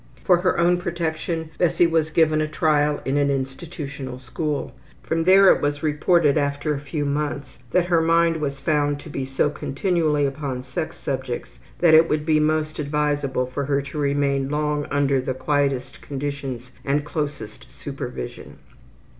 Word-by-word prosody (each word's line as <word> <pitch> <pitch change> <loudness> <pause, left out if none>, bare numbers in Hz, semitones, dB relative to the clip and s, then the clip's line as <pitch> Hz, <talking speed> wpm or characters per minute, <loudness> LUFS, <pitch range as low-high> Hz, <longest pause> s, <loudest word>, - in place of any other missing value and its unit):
For 180 - +5
her 180 +1 +1
own 175 +1 +3
protection 165 -1 -3
Bessie 175 0 +3
was 165 -2 +1
given 155 -1 +3
a 155 - 0
trial 150 -1 +1
in 135 +2 0
an 145 -1 +2
institutional 135 -1 -4
school. 145 +3 -3 0.3
From 165 0 -1
there 190 +1 +7
it - - -4
was 145 0 -1
reported 155 0 +3
after 140 +1 -1
a 140 - -3
few 145 +1 -3
months 145 -2 -3
that 180 +7 +2
her 170 -2 +3
mind 165 0 +3
was 140 -3 -3
found 145 -1 +1
to 155 - -10
be 135 -2 -3
so 135 +2 0
continually 150 -1 0
upon 135 -2 -3
sex - - -5
subjects - - -4 0.2
that 170 -2 +6
it 160 +1 +7
would 150 0 0
be 155 -1 +3
most 155 0 0
advisable 145 -3 0
for 130 +2 -4
her 140 0 +1
to 140 +2 -6
remain 140 -1 +1
long 150 0 -1
under 140 -2 +2
the 130 0 -3
quietest 135 -2 -1
conditions 135 -3 -5
and 145 +1 0
closest 145 -8 -5
supervision. - - -7
145 Hz, 165 wpm, -23 LUFS, 140-160 Hz, 0.3 s, there